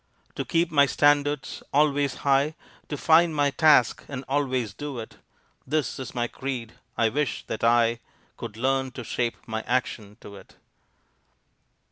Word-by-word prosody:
To - - -3
keep 170 0 0
my 140 -2 +5
standards 145 +1 +1
always 145 -2 +2
high, 140 +3 +3 0.3
To 145 - -3
find 160 +2 +4
my 145 -1 +2
task 145 -5 +4
and 135 -2 -6
always 130 -6 -1
do 145 +3 -6
it; 115 -1 -8 0.5
This 150 0 -1
is 130 0 -7
my 120 -1 0
creed 125 -3 -5 0.2
I 115 - +3
wish 145 +4 -2
that 110 - -5
I 115 0 +3 0.4
Could 105 - -8
learn 135 +2 0
to 125 - -7
shape 120 +1 -2
my 110 -2 -3
action 110 -4 -2
to 100 - -11
it. - - -16
135 Hz, 150 wpm, -25 LUFS, 120-145 Hz, 0.5 s, my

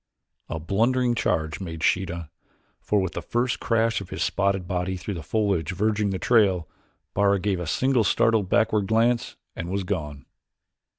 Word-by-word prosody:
A 80 - -3
blundering 120 +9 +1
charge 80 -8 -1
made 80 -4 -6
Sheeta, 85 -4 0 0.5
for 105 - +1
with 95 -2 -1
the - - -4
first 120 +1 -1
crash 115 -2 +1
of 95 - -9
his - - -2
spotted 100 -2 0
body 90 0 -2
through 95 +3 -5
the 85 - -5
foliage 95 -2 0
verging 105 +2 +1
the 95 - -2
trail, 95 -7 +3 0.5
Bara 100 0 +3
gave 95 -1 -1
a 90 - -4
single 130 +6 +2
startled 105 -1 +2
backward 105 -2 +2
glance 115 +2 +1 0.2
and 85 - -5
was 100 +1 -1
gone. 75 -7 -4
100 Hz, 165 wpm, -25 LUFS, 90-110 Hz, 0.5 s, trail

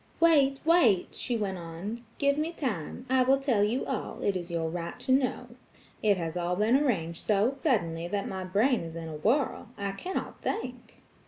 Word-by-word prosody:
"Wait, 285 -5 +4
wait!" 310 - +4
she 245 -2 -2
went 195 -4 -2
on, 175 +8 -6
"give 280 -1 +3
me 310 +3 -1
time. 250 - -4
I 260 0 +3
will 265 +2 +4
tell 255 -7 +2
you 225 +5 0
all; - - -4
it 200 - +1
is 175 -1 -4
your 165 -1 -1
right 170 +1 -5
to - - -1
know. 255 -2 +1 0.5
It 205 -3 +3
has 165 -1 -3
all 175 0 0
been 215 +6 +3
arranged 185 - 0
so 210 +3 +3
suddenly 185 - 0
that 200 +2 -2
my 190 -1 -4
brain 210 +7 +2
is 165 -1 -7
in 165 -1 -5
a 155 -1 -6
whirl–I 220 - 0
cannot 360 - -5
think!" 250 - -5
215 Hz, 185 wpm, -29 LUFS, 175-265 Hz, 0.5 s, Wait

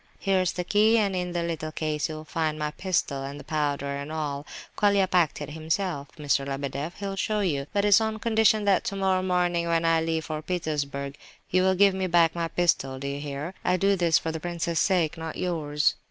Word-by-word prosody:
Here's 190 -2 +1
the 180 - -2
key, 215 +5 +4
and 200 -3 +1
in 180 -1 -2
the 170 -1 -1
little 160 -2 -3
case 155 0 -2
you'll 155 0 -7
find 155 -1 -1
my 150 0 -2
pistol 155 -6 -1
and 140 +1 -6
the - - -9
powder, 145 -2 -1
and 140 +2 -6
all. 145 -2 -3 0.3
Colia 200 -2 +3
packed 175 -5 +2
it - - -7
himself, 160 -1 -2
Mr. 145 -2 +1
Lebedeff; 140 +3 -4
he'll 200 -1 -4
show 210 +2 0
you; 145 -7 -1
but 200 0 +1
it's 205 +1 +6
on 220 0 -1
condition 220 -2 +3
that 195 -2 +3
tomorrow 190 -1 0
morning, 175 -2 +1
when 165 0 +1
I 165 0 +3
leave 160 -1 -1
for 155 -1 -4
Petersburg, 145 -5 -3 0.3
you 185 - +4
will 190 0 +3
give 200 +1 +5
me 190 0 -1
back 170 -2 +4
my 170 -1 -2
pistol, 160 -6 +1
do 135 - -7
you 140 0 -3
hear? 145 +4 -5
I 180 +1 +2
do 195 +2 +3
this 170 -3 +3
for 160 - -2
the 160 - -4
prince's 170 -1 -2
sake, 175 -4 +1
not 160 -1 -5
yours." 150 -5 0
165 Hz, 210 wpm, -26 LUFS, 150-185 Hz, 0.3 s, it's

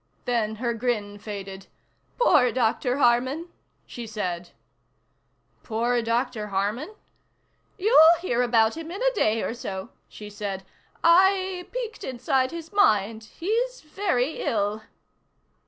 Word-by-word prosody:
Then 225 -3 0
her 235 +1 -2
grin 215 -4 -2
faded. 195 -2 -7 0.5
"Poor 265 - +5
Dr. 250 +2 0
Harman," 260 +6 +2 0.4
she 235 -2 -8
said. 180 -5 -4 1.1
"Poor 235 +2 0
Dr. 230 -1 -1
Harman?" 210 - -2 0.8
"You'll 360 -5 +7
hear 245 -9 0
about 230 -2 +3
him 325 0 -7
in 390 +7 -5
a - - +3
day 225 - +1
or - - -2
so," 190 -5 -6 0.2
she 210 - -10
said. 200 -2 -5 0.4
"I 370 +1 +4
peeked 480 -3 -5
inside 255 +1 0
his 335 +3 -8
mind. 220 - +2
He's 465 - -2
very 305 -4 -1
ill." 210 0 -1
245 Hz, 120 wpm, -25 LUFS, 215-335 Hz, 1.1 s, You'll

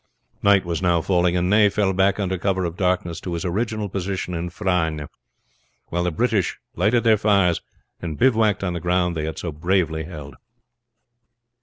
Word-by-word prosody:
Night 100 -2 +4
was 85 -1 -2
now 85 -2 +3
falling, 90 +1 +1
and 90 0 +1
Ney 105 +1 +5
fell 100 -1 +1
back 95 +2 +2
under 95 -2 -1
cover 95 0 0
of 85 -1 -4
darkness 90 -3 -1
to 90 - -5
his 85 - -4
original 105 +3 -1
position 95 -1 -3
in 85 +1 -3
Frasnes; 85 -6 -1 0.8
while 85 +1 -1
the - - +2
British 105 +2 0 0.2
lighted 110 +7 +2
their 110 -2 +5
fires, 100 -5 +2 0.4
and 80 -3 -5
bivouacked 110 -6 +3
on 90 -2 -1
the 85 - -3
ground 90 0 0
they 75 -1 -2
had 80 - -5
so 85 - -4
bravely 80 0 0
held. 75 -6 -9
90 Hz, 175 wpm, -22 LUFS, 85-100 Hz, 0.8 s, Ney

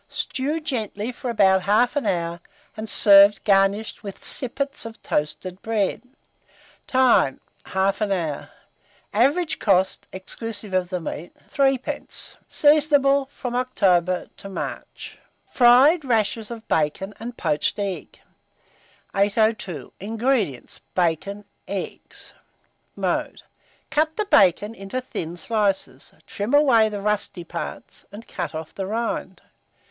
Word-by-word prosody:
Stew 285 +5 -2
gently 235 -7 -3
for 250 0 -6
about 190 -4 +4
1/2 240 +6 +2
hour, 170 -2 -1 0.4
and 215 0 -6
serve 200 -1 +6
garnished 200 +2 +2
with 200 -3 -9
sippets 275 +2 -3
of 225 -1 -9
toasted 180 +5 -3
bread. 215 -4 -1 0.9
Time. 255 - +3 0.3
1/2 195 +2 0
hour. 165 -6 -2 0.6
Average 285 - +2
cost, 190 -2 +1
exclusive 210 +2 -6
of 185 -1 +1
the 180 -1 -2
meat, 165 0 -7 0.2
3d. 270 -2 0
Seasonable 285 -2 +4
from 250 -3 -6
October 185 -8 +1
to 195 - -9
March. 190 - -7 0.3
FRIED 265 +7 +5
RASHERS 225 -3 0
OF 230 -2 -8
BACON 160 +6 0
AND 240 +2 -7
POACHED 150 +2 0
EGGS. 200 -3 -5 0.9
802. 200 - 0
INGREDIENTS. 220 - -1
Bacon; 185 +4 -1 0.2
eggs. 195 0 -7 0.6
Mode. - - -2 0.5
Cut 310 +1 +1
the 425 - 0
bacon 205 - +4
into 195 +4 -5
thin 175 -9 -6
slices, 195 - -1
trim 210 +7 -1
away 240 -7 +5
the 205 -1 -5
rusty 205 -3 -1
parts, 170 0 -7
and 210 +3 -11
cut 175 -3 -5
off 160 0 -6
the 195 -1 -4
rind. 230 +3 -3
210 Hz, 115 wpm, -23 LUFS, 190-245 Hz, 0.9 s, serve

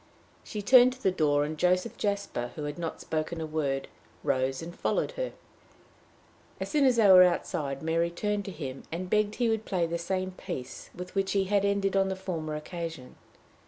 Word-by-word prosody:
She 210 -1 -6
turned 250 +3 +7
to 260 - -17
the 190 - +4
door, 145 -4 +2
and 155 0 -5
Joseph 180 +4 +2
Jasper, 200 - -2
who 150 - -5
had 145 +3 -5
not 165 -1 -4
spoken 160 +1 -3
a 160 - -2
word, 145 -3 -1 0.4
rose 130 +2 0
and 170 +1 -8
followed - - 0
her. - - -3 1.3
As - - -4
soon 295 -3 +3
as 255 -2 +5
they 225 -3 +5
were 185 -1 +9
outside, 150 -6 +1
Mary 165 +1 +1
turned 205 +3 -2
to 195 - -5
him, 135 -7 -6
and 180 +2 -4
begged 210 0 +2
he 240 - +1
would 220 -1 0
play 180 -5 0
the 170 +1 -3
same 185 +2 -2
piece 130 -7 -7
with 180 +1 -8
which 195 -1 0
he 200 -1 +3
had 200 +1 +1
ended 200 -1 +1
on 195 0 +3
the 190 - -2
former 165 -5 -4
occasion. 165 -4 -6
180 Hz, 200 wpm, -29 LUFS, 155-200 Hz, 1.3 s, were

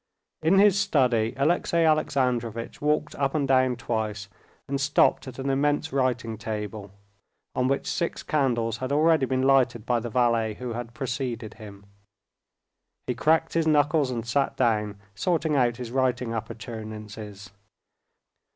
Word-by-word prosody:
In 165 +5 +3
his 200 0 +5
study 120 - +2
Alexey 170 +3 +2
Alexandrovitch 125 -7 0
walked 150 0 0
up 140 +1 0
and 145 -3 +1
down 130 -1 +3
twice, 110 -4 -3 0.4
and 140 0 -2
stopped 140 -1 +2
at 130 - -8
an 135 +1 -4
immense 145 +3 0
writing 120 -5 -1
table, 105 -2 -5 0.6
on 125 - +1
which 135 +1 0
six 170 -2 -2
candles 120 -7 0
had 130 +2 -4
already 155 -1 +3
been 130 0 0
lighted 130 -4 +3
by 120 -1 +1
the 120 +1 -5
valet 115 -2 +1
who 125 0 -5
had 120 0 -6
preceded 125 -5 -4
him. 100 -2 -12 1.2
He - - -1
cracked 160 +1 +2
his 165 -1 +1
knuckles 150 -1 +3
and 120 -2 -3
sat 135 +4 0
down, 105 -4 +1 0.2
sorting 160 - 0
out 120 -3 +2
his 125 -2 -6
writing 125 -2 0
appurtenances. 110 -3 -7
125 Hz, 140 wpm, -26 LUFS, 115-145 Hz, 1.2 s, his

